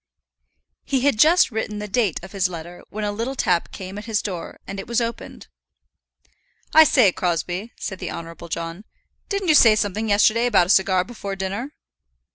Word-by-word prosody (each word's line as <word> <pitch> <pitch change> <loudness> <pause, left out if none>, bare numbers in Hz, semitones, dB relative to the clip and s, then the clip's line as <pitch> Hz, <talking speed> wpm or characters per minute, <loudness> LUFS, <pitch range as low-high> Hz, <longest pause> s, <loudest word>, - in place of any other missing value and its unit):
He 270 -2 -1
had 275 -5 +1
just 325 +3 +5
written 215 -1 -3
the 210 0 -5
date 210 -5 0
of 190 - -10
his 195 -2 0
letter 175 0 -9
when 215 +1 -5
a 205 - -1
little 230 +6 -4
tap 180 -8 0
came 190 +1 -7
at 210 - -10
his 220 -2 -1
door, 180 -5 -6
and 195 0 -6
it 195 - -7
was 235 0 +1
opened. 235 0 -5 1.3
"I 315 0 +9
say, 250 -9 +4
Crosbie," 180 +5 -2
said 190 -4 -5
the - - -5
Honourable 170 0 -8
John, 165 +4 -5 0.5
"didn't 395 -3 -2
you - - +6
say 230 -7 +7
something 215 +1 -1
yesterday 215 +4 +3
about 200 -7 +4
a - - -9
cigar 190 -2 +3
before 200 -3 -6
dinner?" 195 +8 -4
205 Hz, 185 wpm, -22 LUFS, 185-235 Hz, 1.3 s, I